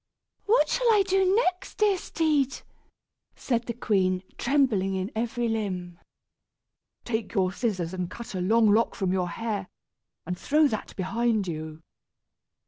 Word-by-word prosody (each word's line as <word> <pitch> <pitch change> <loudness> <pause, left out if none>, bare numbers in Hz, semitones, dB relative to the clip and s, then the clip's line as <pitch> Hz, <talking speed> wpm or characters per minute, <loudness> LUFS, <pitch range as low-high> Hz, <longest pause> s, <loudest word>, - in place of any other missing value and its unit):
"What 460 +4 +4
shall - - +2
I 415 -2 +5
do 385 0 +2
next, 370 -5 0
dear 420 -2 +3
steed?" 305 -6 0 0.7
said 240 -2 -2
the 235 - -2
queen, 190 -5 +1
trembling 240 -8 +1
in 190 +4 -3
every 235 +1 -1
limb. 185 -6 -3 1.1
"Take 230 -1 -3
your 190 -2 +2
scissors 190 -7 -2
and 180 -2 -3
cut 235 +2 -8
a 185 - -2
long 220 +5 +3
lock 225 +3 +2
from 190 -4 -1
your 180 -2 0
hair, 205 0 -3 0.6
and 180 - -3
throw 300 - +3
that 215 - -5
behind 210 +2 0
you." 155 -1 -6
225 Hz, 140 wpm, -27 LUFS, 185-275 Hz, 1.1 s, I